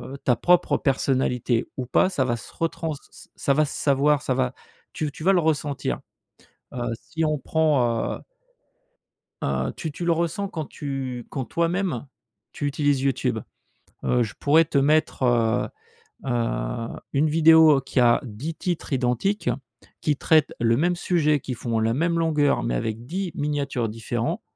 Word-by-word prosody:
heu, - - -8
ta 125 - +3
propre 175 +9 +3
personnalité 130 -4 0
ou 130 - -2
pas, 185 +9 +3
ça 140 -8 0
va 120 -2 0
se - - -12
retrans 165 -1 -2
ç 140 - -14
ça 140 - +1
va 155 +2 +3
se - - -7
savoir, 145 +1 +3
ça 130 - -1
va 130 0 0 0.4
tu 155 - -2
v 145 - -3
tu 155 - -10
vas 195 +2 +5
le 180 - +4
ressentir. 150 -3 -1 0.7
Heu, 125 - -5 0.2
si 160 -1 -3
on 155 -1 +1
prend, 135 -7 +1
heu - - -16 1.2
Heu, - - -1
tu 160 -3 -4
tu 170 +4 -5
le 170 - +3
ressens 170 +4 -1
quand 160 -5 -5
tu 135 -4 -5
quand 130 -3 -4
toi-même 170 -5 -1 0.5
tu 145 - -4
utilises 145 -1 +1
YouTube. 135 -2 0 0.7
Heu, 125 -1 +2
je 110 -3 -4
pourrais 160 +3 +5
te 150 -2 0
mettre, 150 0 +2
heu 120 -1 +2 0.6
heu, 120 -1 -1 0.3
une 150 +3 +2
vidéo 160 -2 +6
qui 130 - -1
a 120 -1 +5
10 130 +8 -6
titres 175 -5 -3
identiques, 125 - 0 0.5
qui 150 -2 +1
traite 155 +1 +3
le 115 0 +3
même 175 +3 +2
sujet, 155 -4 +1
qui 130 - -5
font 115 -1 -2
la 115 +1 +1
même 170 +4 +1
longueur 150 - +2
mais - - -1
avec 110 - -3
10 185 +4 -3
miniatures 140 -6 -1
différents. 120 - -3
145 Hz, 170 wpm, -24 LUFS, 125-160 Hz, 1.2 s, vidéo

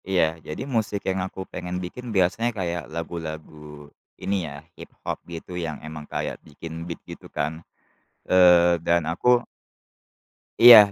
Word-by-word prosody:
Iya, 95 -2 +4 0.2
jadi 75 - -5
musik 110 -6 -1
yang 95 0 0
aku 95 - -11
pengen 90 0 -4
bikin, 125 +7 -7
biasanya 95 +6 +2
kayak 85 -3 -2
lagu-lagu 80 -2 -7 0.3
ini 95 -4 -1
ya 75 +2 -10
hiphop - - -6 0.2
gitu 85 +2 -8
yang 80 -4 -3
emang 80 -1 -7
kayak - - -3
bikin 80 +2 -8
beat 85 - -4
gitu - - -10
kan, 80 +3 -3 0.7
eee, 90 -1 +6
dan 85 -2 +3
aku 120 +9 +3 1.1
Iya, 115 -4 +11
85 Hz, 135 wpm, -25 LUFS, 80-95 Hz, 1.1 s, Iya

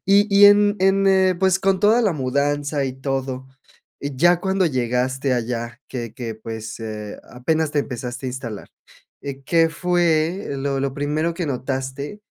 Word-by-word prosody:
y 200 +1 +5
y 205 0 +9
en 205 0 +5
en, 195 +1 +3
eh, 190 -1 +4
pues, 190 0 +3
con 195 -1 +2
toda 215 +4 +4
la 200 -5 +2
mudanza 145 +1 -1
y 130 - -3
todo, 135 -1 -3 0.6
y 140 -2 -4
ya 175 +3 +4
cuando 190 -1 +1
llegaste 130 0 0
allá 120 0 -3
que 120 -4 -5
que 115 -4 -5
pues, 110 0 -7
eh, 105 -2 -6
apenas 155 +5 0
te 150 - -1
empezaste 125 -1 -4
a - - -1
instalar. 115 -5 -7 0.5
Eh, 140 -1 -6
¿qué 165 +1 +3
fue 175 +1 0
lo 135 0 -1
lo 135 -1 -2
primero 150 +4 -1
que 170 -2 -3
notaste? 135 +7 -4
140 Hz, 165 wpm, -22 LUFS, 130-175 Hz, 0.6 s, y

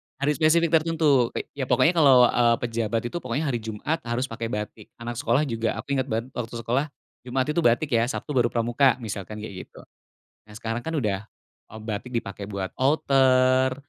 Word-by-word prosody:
hari 140 +2 0
spesifik 160 +1 +3
tertentu 155 -6 +3
ke - - -2
ya 135 -2 -4
pokoknya 165 - +4
kalau, 140 -7 +6
eee, 120 -1 +3
pejabat 115 -1 -1
itu, 175 - -3
pokoknya 130 +2 -3
hari 120 - -2
Jumat 110 +9 -3
harus 120 +2 -1
pakai 115 0 -4
batik. 105 -1 -6
Anak 120 0 -6
sekolah 130 +2 +2
juga, 115 -4 -2
aku 140 - -7
inget 130 - -1
banget 115 +2 -3
waktu 120 -1 -6
sekolah, 120 +5 -1 0.4
Jumat 130 +1 0
itu 170 - 0
batik 125 +2 +2
ya, 115 0 +2
Sabtu 145 +2 -5
baru 125 -3 +3
Pramuka 120 +3 +2
misalkan 105 -1 -6
kayak 95 -4 -8
gitu. - - -15 0.6
Nah 105 - -14
sekarang 115 +1 -3
kan 160 +5 -4
udah, 105 -5 -2 0.4
eee, 110 - -11
batik 110 +3 -5
dipakai 100 -2 -4
buat 95 -2 -4
outer, 130 -2 +3
120 Hz, 185 wpm, -25 LUFS, 115-140 Hz, 0.6 s, kalau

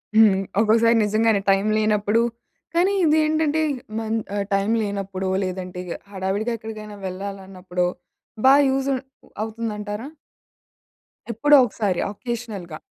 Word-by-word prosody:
హ్మ్. 205 -3 +5 0.2
ఒకోక్కసారి 230 +1 +4
నిజంగానే 215 0 +2
టైమ్ 195 +2 +2
లేనప్పుడు, 215 +1 +2 0.5
కానీ 365 +4 +3
ఇది 310 0 +4
ఏంటంటే 310 0 +1 0.4
మన్ 225 0 -1 0.2
ఆహ్, 200 -1 -1
టైమ్ 195 +3 +2
లేనప్పుడో 195 -2 -3
లేదంటే 185 -1 -5
ఇగ 175 - -7 0.2
హడావిడిగా 195 +4 -2
ఎక్కడికైనా 215 -1 -8
వెళ్ళాలన్నప్పుడో 185 -2 -4 0.6
బా 265 - +8 0.2
యూజ్ 270 +1 0
ఉం 260 - -1 0.4
అవుతుందంటారా? 215 +1 -4 1.2
ఎప్పుడో 290 +7 +4
ఒకసారి 205 -5 -1
అకేషనల్‌గా. 215 -8 -6
210 Hz, 110 wpm, -23 LUFS, 195-230 Hz, 1.2 s, బా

